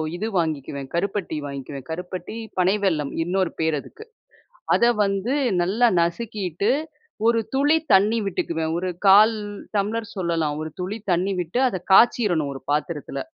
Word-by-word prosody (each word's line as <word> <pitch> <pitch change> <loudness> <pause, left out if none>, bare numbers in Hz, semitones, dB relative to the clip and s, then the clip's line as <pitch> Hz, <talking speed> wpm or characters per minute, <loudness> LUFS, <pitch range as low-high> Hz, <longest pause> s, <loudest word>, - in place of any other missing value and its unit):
இது 210 +5 -3
வாங்கிக்குவேன் 140 -4 -3
கருப்பட்டி 190 -2 -2
வாங்கிக்குவேன். 140 -1 -7
கருப்பட்டி, 180 +3 -6 0.2
பனை 185 +2 +3
வெல்லம் 155 -7 0
இன்னொரு 185 +1 -1
பேரு 160 -1 +1
அதுக்கு. 440 - -13 0.7
அதை 235 - +4
வந்து 200 +5 -1 0.3
நல்லா 215 +7 +3
நசுக்கிட்டு, 200 +1 -1 0.6
ஒரு 230 0 +4 0.2
துளி 290 +4 +4 0.2
தண்ணி 210 +4 +4
விட்டுக்குவேன். 165 -4 -2
ஒரு 185 +1 -2 0.2
1/4 210 +4 +7 0.4
டம்ளர் 220 +3 -1
சொல்லலாம். 165 -5 -1
ஒரு 155 - -4
துளி 190 +4 -3 0.2
தண்ணி 185 +3 0
விட்டு 175 +8 -2
அதை 185 - -4
காய்ச்சிறணும், 190 -9 +4
ஒரு 135 - -9
பாத்திரத்தில. 150 +1 -2
185 Hz, 135 wpm, -23 LUFS, 160-210 Hz, 0.7 s, 1/4